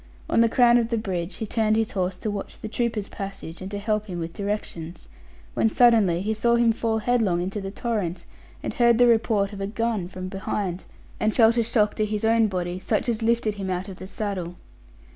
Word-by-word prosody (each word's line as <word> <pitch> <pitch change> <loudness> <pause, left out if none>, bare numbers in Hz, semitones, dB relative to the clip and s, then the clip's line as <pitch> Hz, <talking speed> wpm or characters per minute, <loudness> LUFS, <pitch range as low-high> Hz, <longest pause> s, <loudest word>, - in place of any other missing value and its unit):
On - - +3
the 230 - +4
crown 240 0 +5
of 230 -1 -1
the 230 - 0
bridge 185 -4 -3
he 220 - -4
turned 215 0 +1
his 225 0 0
horse 185 -1 -1
to 215 - -3
watch 200 -1 -6
the - - -6
trooper's 225 -2 -2
passage, 195 -4 -7
and 185 - -5
to 205 - -4
help 210 +1 -1
him 180 -3 -5
with 165 0 -5
directions; 185 -5 -5 0.5
when 225 - +2
suddenly 215 -8 +4
he 215 +2 0
saw 235 +2 +2
him 235 -1 +4
fall 225 0 -1
headlong 220 -6 +1
into 190 +4 -3
the 195 - -4
torrent, 195 -5 -3 0.4
and - - -3
heard 235 -1 +4
the 245 - +6
report 220 -3 +2
of 200 - -7
a 195 - -1
gun 225 -3 -1
from 185 0 -7
behind, 190 -1 -3 0.3
and 215 0 +1
felt 230 -1 +5
a 235 - +3
shock 215 -2 +2
to 215 - 0
his 210 +1 -2
own 225 0 +4
body, 180 -2 -3
such - - -1
as 230 -1 0
lifted 225 -1 +1
him 195 -2 -5
out 185 +1 -2
of 190 -2 -8
the 185 - -8
saddle. 190 -4 -4
210 Hz, 220 wpm, -25 LUFS, 190-225 Hz, 0.5 s, the